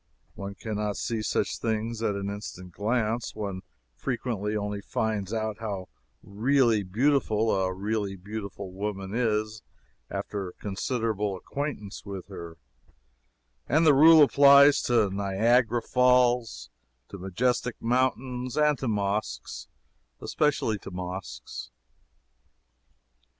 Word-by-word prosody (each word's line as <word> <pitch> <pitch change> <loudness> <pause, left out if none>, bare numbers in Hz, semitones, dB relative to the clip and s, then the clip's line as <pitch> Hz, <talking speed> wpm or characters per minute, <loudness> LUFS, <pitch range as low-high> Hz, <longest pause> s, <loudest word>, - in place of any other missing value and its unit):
One 100 0 -7
can 110 0 -5
not 105 -1 -2
see 115 -2 -2
such - - -1
things 115 0 -2
at 105 -3 0
an 100 0 -3
instant 100 -3 -7
glance 110 +3 -1
one 100 -3 -4 0.3
frequently 110 - -2
only 105 -1 -3
finds 105 -2 -2
out 110 -1 -2
how 100 -4 -5 0.3
really 115 +1 +2
beautiful 110 +1 +1
a 95 -1 +1
really 100 +1 -2
beautiful 100 0 -7
woman 95 -1 -4
is 110 -2 0 0.5
after 95 -3 -4
considerable 105 -1 -2
acquaintance 125 -4 -5
with 100 -2 -7
her; 85 -4 -8 1.1
and 155 +5 +4
the 150 - +7
rule 155 +2 +8
applies 140 0 +7
to 115 -5 +3
Niagara 110 +4 +2
Falls, 125 - +2 0.4
to 100 - -9
majestic 120 +6 -1
mountains 125 +1 -1
and 150 -2 +3
to 130 - -3
mosques 100 - -2 0.5
especially 135 -8 0
to - - -9
mosques. 90 0 -6
110 Hz, 115 wpm, -27 LUFS, 100-125 Hz, 1.1 s, rule